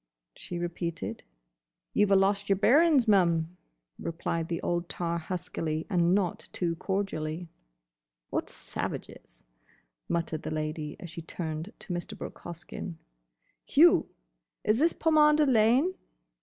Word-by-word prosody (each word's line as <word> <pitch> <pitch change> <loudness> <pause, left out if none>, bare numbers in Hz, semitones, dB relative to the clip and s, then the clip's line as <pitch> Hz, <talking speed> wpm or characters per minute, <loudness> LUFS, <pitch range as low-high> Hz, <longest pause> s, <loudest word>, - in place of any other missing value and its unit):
she 175 - -6
repeated. 170 - -4 0.7
"You 210 - +4
've - - -2
a - - +7
lost 200 +1 +2
yer 195 - +5
bearin's, 275 - +5
mum," 170 -4 +3 0.4
replied 165 0 -2
the 170 -1 -2
old 175 0 -1
tar 170 -1 -2
huskily 160 -2 -3
and 175 0 +4
not 190 -4 -1
too 170 -2 -1
cordially. 175 -4 -2 0.8
"What - - -1
savages!" - - -6 0.7
muttered 165 -2 -1
the - - -4
Lady 155 -1 -3
as 175 - -8
she 165 - -6
turned 160 +2 -5
to 185 - -5
Mr. 175 0 -5
Brooke - - -7
Hoskyn. 175 +1 -7 0.7
"You! - - +5 0.5
Is 215 +3 +2
this 330 +3 +4
Pomander 305 -1 +5
Lane?" 255 +7 +4
175 Hz, 130 wpm, -29 LUFS, 165-205 Hz, 0.8 s, a